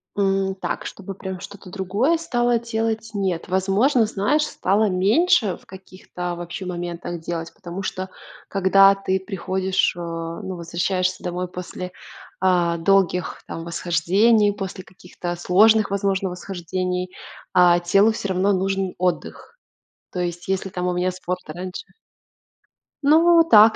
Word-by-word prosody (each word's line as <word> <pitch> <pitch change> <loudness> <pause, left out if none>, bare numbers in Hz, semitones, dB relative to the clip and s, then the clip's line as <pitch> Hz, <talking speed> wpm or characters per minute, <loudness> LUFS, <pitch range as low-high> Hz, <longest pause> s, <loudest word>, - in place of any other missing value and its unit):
М, 195 -1 +1
так, - - -4
чтобы, 195 -1 -7
прям, 190 -2 -6
что-то 195 -1 -11
другое 200 - +1
стала 240 -7 +1
делать? 225 -1 -2
Нет, 185 -4 -1
возможно, 200 +7 +2
знаешь, 240 +9 +1
стала 210 -1 +1
меньше 215 - +3
в - - -23
каких-то, 185 -2 -7
вообще, 175 +2 -6
моментах, 175 -1 -5
делать, 165 0 -5
потому 175 +2 -7
что, 190 0 -4 0.4
когда 195 0 +5
ты 190 -1 -1
приходишь, 190 -1 -1
э, - - -9
ну, 170 +3 -5
возвращаешься 180 +2 -1
домой 180 0 -3
после, 180 0 -7 0.5
а, 175 -2 +2
долгих, 180 0 +1
там, 165 - -6
восхождений, 190 +6 +2
после 190 -2 -6
каких-то 180 -1 -7
сложных, 210 +5 +4
возможно, 195 -1 0
восхождений, 180 0 -3 0.4
а, 175 -1 +6
телу, 195 +5 +4
всё 205 -2 -4
равно, 190 +2 +2
нужен 190 0 -1
отдых. 185 - -3 0.5
То 180 - -4
есть, 175 +1 -4
если, 190 0 0
там, 180 -1 -3
у 180 - 0
меня 180 +1 0
спорт 180 0 -4
раньше 180 +4 -6 1.2
Ну, 330 +3 +6
так. 220 +1 +8
190 Hz, 135 wpm, -22 LUFS, 180-200 Hz, 1.2 s, так